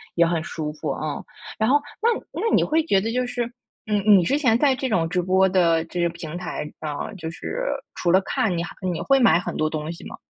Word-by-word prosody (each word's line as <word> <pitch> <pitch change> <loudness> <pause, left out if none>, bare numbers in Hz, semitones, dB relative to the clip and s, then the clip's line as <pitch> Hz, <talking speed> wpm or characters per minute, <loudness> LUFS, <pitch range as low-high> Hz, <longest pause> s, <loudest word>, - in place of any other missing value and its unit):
也 170 - +5
很 165 -1 0
舒 155 -2 -4
服， 150 - -4
嗯。 150 -2 -4 0.3
然 220 +2 +1
后 290 +2 +4 0.2
那 460 - +4 0.3
那 450 - +2
你 - - +4
会 320 +1 +2
觉 195 -10 +3
得 225 - -2
就 250 +1 0
是， 245 0 -2 0.4
嗯， 210 -1 +1
你 200 -4 +7
之 275 +12 +1
前 250 -6 +3
在 275 +1 +3
这 260 0 -2
种 175 -8 +1
直 180 +1 0
播 190 +2 +3
的 170 -3 +3
这 175 +1 -5
些 170 - +3
平 170 -1 -7
台 180 -4 -4
上 150 -2 -4
啊， - - -5
就 165 -4 -5
是 485 - -5 0.3
除 175 - -1
了 190 +2 +5
看， 195 -1 -1
你 170 - -1
还 175 - -7 0.2
你 165 - -4
会 275 -1 +3
买 235 -8 +5
很 - - -5
多 155 0 +1
东 155 0 -4
西 170 - -10
吗？ - - -8
185 Hz, 270 characters per minute, -23 LUFS, 165-240 Hz, 0.4 s, 你